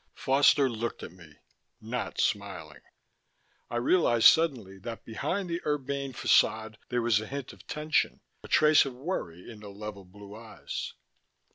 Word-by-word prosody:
Foster 140 +1 +4
looked 115 -1 -4
at - - -7
me, 85 -5 -16 0.4
not 115 -1 -5
smiling. 95 -7 -2 0.9
I - - -5
realized 120 -2 +2
suddenly 125 - 0
that 115 +3 -8
behind 180 - -3
the 170 0 -3
urbane 140 -2 -2
façade 110 -2 +2
there 120 -1 0
was 115 -3 +3
a 110 - -7
hint 140 0 -6
of - - -18
tension, 150 +1 0 0.2
a - - -11
trace 155 0 +5
of 135 -3 -6
worry 125 - -5
in 115 -3 -10
the 105 -1 -10
level 100 0 -8
blue 100 +2 -13
eyes. 115 0 -7
115 Hz, 150 wpm, -28 LUFS, 105-140 Hz, 0.9 s, trace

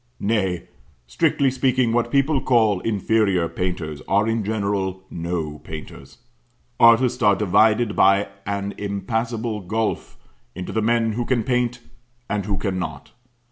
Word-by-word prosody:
Nay, 95 -5 -1 0.4
strictly 130 - +1
speaking, 130 -2 +1
what 120 0 +1
people 140 +1 +2
call 110 -6 +3
inferior 100 -4 +1
painters 85 -5 -4
are 110 - +2
in 115 -1 0
general 100 -3 -2
no 80 -3 -4
painters. 80 -1 -10 0.6
Artists 115 +2 +5
are 100 -1 +5
divided 105 +3 +3
by 100 +1 +4 0.2
an 100 0 -2
impassable 110 +3 -2
gulf 110 +4 -3 0.4
into 90 0 -6
the 110 - 0
men 115 0 +2
who 120 +3 -2
can 120 -2 0
paint, 125 -1 0 0.5
and 105 -1 -2
who 100 -2 -1
cannot. 90 -8 -4
105 Hz, 130 wpm, -22 LUFS, 95-115 Hz, 0.6 s, Artists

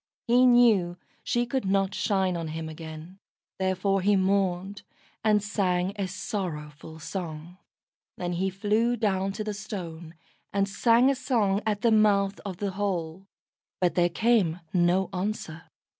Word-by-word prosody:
He 250 +2 +5
knew 220 -8 +4 0.3
she 240 0 0
could 255 -1 -2
not 195 0 +1
shine 190 -3 0
on 165 -1 -3
him 160 +1 -5
again, 160 +3 -9 0.4
therefore 190 +1 +1
he 205 +2 +3
mourned, 190 0 0 0.4
and 210 -1 +3
sang 190 -2 0
a 200 -2 -2
sorrowful 160 -6 -5
song. 165 +1 -7 0.6
Then 175 -1 -3
he 190 +2 0
flew 215 +5 +1
down 195 -3 0
to 215 - -4
the 210 0 -3
Stone, 175 -6 -7 0.4
and 200 0 +1
sang 235 +6 +4
a - - -1
song 225 -7 +1
at 210 -1 0
the 235 -2 +3
mouth 205 -2 +3
of 190 -3 -6
the 200 0 -2
hole, 190 -2 -3 0.5
but 180 -2 +2
there 175 -1 +3
came 185 -4 +2
no 180 +1 +3
answer. 180 -4 -4
195 Hz, 145 wpm, -27 LUFS, 175-210 Hz, 0.6 s, He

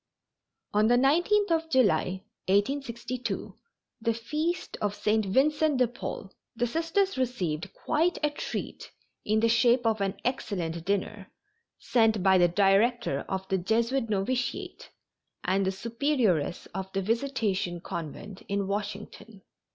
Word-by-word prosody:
On 210 +1 +4
the 240 - +5
19th 345 +10 +3
of 325 0 +1
July, 200 - +2 0.3
1862, 240 +3 -1 0.5
the 230 0 +1
feast 305 +9 -2
of 205 -1 -1
St. 215 +1 +1
Vincent 295 +6 +2
de 250 -1 +4
Paul, 215 -4 -7 0.2
the 240 +1 +1
Sisters 330 +6 0
received 185 -12 -2
quite 330 +3 0
a 300 - +2
treat - - -5 0.4
in 215 +1 +2
the 230 - +4
shape 235 +1 +3
of 220 -2 +1
an 195 -1 0
excellent 175 -9 -2
dinner, 200 0 -2 0.5
sent 220 -5 +2
by 190 -1 +5
the 175 - +6
director 200 - +2
of 190 0 -3
the 190 - +1
Jesuit 230 +5 0
Novitiate 245 - -2 0.5
and 190 +1 +1
the - - +2
Superioress 225 - 0
of 190 0 -5
the 195 - 0
Visitation 220 -6 -1
Convent, 170 +4 -7
in 200 0 -1
Washington. 205 0 -5
225 Hz, 130 wpm, -28 LUFS, 195-260 Hz, 0.5 s, the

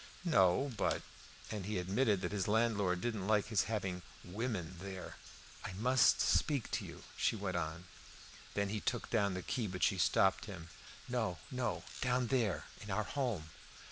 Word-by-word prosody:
"No; 130 - +4
but - - +1 0.2
" - - -15
And 100 -3 -4
he 105 -2 -1
admitted 100 +3 +2
that 90 - -2
his 100 -3 -1
landlord 105 -5 +2
didn't 110 -4 -2
like 105 -1 +3
his 110 -4 +3
having 95 -5 -2 0.2
"women" 95 -3 -3
there. 95 -1 -6 0.5
"I 95 - -4
must 125 +5 +4
speak 140 -7 +2
to - - 0
you," - - -9
she - - +2
went 100 -4 -2
on. 85 +1 -2 0.7
Then 100 -1 +1
he 105 +1 -1
took 120 - -2
down 100 -4 +2
the 90 - -4
key, 115 -4 -1
but 90 -1 -3
she 95 - +3
stopped - - +3
him. 85 +1 -8 0.4
"No, 110 -8 -1
no! 125 -2 -1 0.2
Down 125 -1 +1
there, 115 -8 +2 0.2
in - - -8
our - - +1
home!" 115 - -2
100 Hz, 175 wpm, -36 LUFS, 90-120 Hz, 0.7 s, No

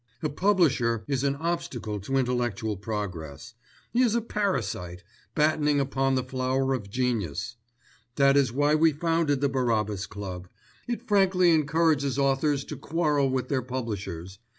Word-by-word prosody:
"A 155 - +1
publisher 145 - +2
is 135 -2 -1
an 140 0 +1
obstacle 140 -10 -3
to 135 +8 -2
intellectual 120 -4 -1
progress. 100 -3 -6 0.4
He 240 - +3
is 235 -3 +3
a 235 - +2
parasite, 120 - -2 0.3
battening 150 -1 +2
upon 135 0 +1
the 130 - 0
flower 130 +1 0
of 105 -6 -4
genius. 115 - -2 0.6
That 140 -1 +4
is 140 -4 +3
why 145 +4 +2
we 160 0 +4
founded 160 -2 0
the 140 - +2
Barabbas 110 -7 0
Club. 95 -3 -7 0.4
It 240 0 -4
frankly 190 -3 +4
encourages 155 -3 +2
authors 140 +1 +1
to - - -7
quarrel 150 -4 +1
with 130 -1 -1
their 135 -3 +1
publishers. 100 -8 -5
135 Hz, 145 wpm, -27 LUFS, 115-155 Hz, 0.6 s, That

